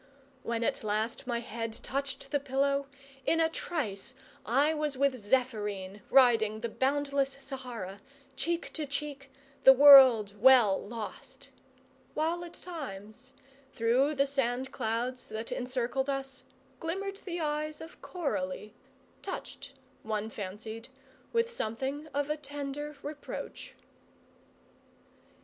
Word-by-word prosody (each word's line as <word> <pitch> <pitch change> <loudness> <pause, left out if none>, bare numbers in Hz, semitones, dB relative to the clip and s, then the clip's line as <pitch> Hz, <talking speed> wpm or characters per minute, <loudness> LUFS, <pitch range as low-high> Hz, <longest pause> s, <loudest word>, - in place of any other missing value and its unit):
When 230 0 -2
at - - -1
last 215 +4 -2
my 235 -2 -1
head 230 -1 -4
touched 275 +4 -4
the 285 - +2
pillow, 275 0 0 0.4
in 330 - +2
a 325 0 +4
trice 265 - -3 0.3
I 280 +7 +3
was 300 -3 -1
with 280 0 +3
Zephyrine, 210 -4 -1
riding 225 -5 +5
the 235 - -2
boundless 275 +1 0
Sahara, 250 -8 -6 0.4
cheek 340 0 -2
to 310 -2 -3
cheek, 280 0 -5 0.3
the 265 - +10
world 260 -7 +9
well 240 -6 +7
lost; 220 0 -8 0.6
while 330 +3 0
at 345 - -9
times, 255 - -7 0.4
through 255 +6 +2
the 275 0 +3
sand 265 -2 -1
clouds 245 +2 -2
that 220 +1 -5
encircled 255 +2 -1
us, 270 -1 -3 0.3
glimmered 390 +4 -3
the 355 -4 -5
eyes 305 0 -2
of 325 +1 -11
Coralie, 275 - -3 0.5
touched, 390 - -7 0.3
one 215 0 -3
fancied, 220 +3 -7 0.4
with 465 0 +2
something 275 - -3
of 285 -1 -1
a 305 - -1
tender 290 0 -5
reproach. 295 0 -7
265 Hz, 120 wpm, -30 LUFS, 230-290 Hz, 0.6 s, the